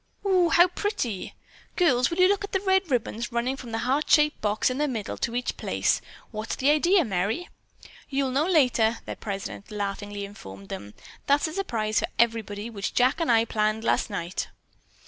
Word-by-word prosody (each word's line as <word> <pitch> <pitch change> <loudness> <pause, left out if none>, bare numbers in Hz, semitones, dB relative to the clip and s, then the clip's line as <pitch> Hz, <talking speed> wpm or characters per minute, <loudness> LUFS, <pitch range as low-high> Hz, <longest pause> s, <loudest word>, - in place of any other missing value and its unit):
"Oh 370 -3 +4
oo, - - +1
how 345 +2 +6
pretty!" 255 - -3 0.4
"Girls, 255 -9 +3
will 335 - -4
you 365 0 +6
look 400 +1 +1
at 400 - -7
the 385 - +2
red 380 -2 +2
ribbons 240 -2 -1
running 235 +3 0
from 255 -4 -9
that 225 - -1
heart 275 +4 0
shaped 300 0 +4
box 210 +4 +1
in 255 - -3
the 300 - +2
middle 225 -7 -3
to 235 - -2
each 245 - -2
place! - - 0 0.3
What's 215 0 -4
the 275 +3 +3
idea, 345 +3 +4
Merry?" 215 - -1 0.6
"You'll 270 -1 0
know 285 +6 +1
later," 245 -9 +3
their - - -5
president 200 -1 -6
laughingly 205 -1 -4
informed 100 - -11
them. 100 0 -7 0.3
"That's 285 +3 +3
a - - -8
surprise 225 - -1
for - - -1
everybody 225 -2 0
which 205 -4 -5
Jack 255 +6 +3
and 330 -6 +2
I 225 0 +4
planned 215 0 0
last - - +1
night." 180 -3 -3
240 Hz, 190 wpm, -26 LUFS, 215-305 Hz, 0.6 s, how